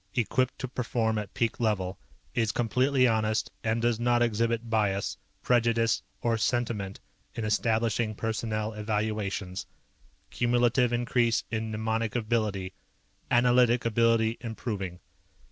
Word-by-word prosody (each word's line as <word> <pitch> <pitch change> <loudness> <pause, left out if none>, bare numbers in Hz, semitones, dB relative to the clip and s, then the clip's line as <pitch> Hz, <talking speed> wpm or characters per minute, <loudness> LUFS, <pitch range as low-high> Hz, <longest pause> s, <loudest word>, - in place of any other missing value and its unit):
Equipped 130 +2 +1
to 130 - -4
perform 115 -3 -1
at 105 -1 -6
peak 115 -1 0
level. 100 -5 0 0.3
Is 115 -3 +1
completely 125 +3 +2
honest 110 -1 0
and 115 +1 0
does 120 -1 +2
not 120 0 +3
exhibit 115 0 0
bias, 105 -3 0 0.3
prejudice, 115 -1 +2 0.2
or 115 -1 +1
sentiment 110 -5 -1 0.4
in 115 - -3
establishing 110 0 +1
personnel 110 0 -2
evaluations. 105 -3 -2 0.6
Cumulative 120 0 +2
increase 120 -1 +1
in 110 -1 -2
mnemonic 110 +1 -1
ability. 110 -5 -1 0.6
Analytic 120 0 +4
ability 115 0 +2
improving. 105 -6 -4
115 Hz, 110 wpm, -28 LUFS, 110-120 Hz, 0.6 s, Analytic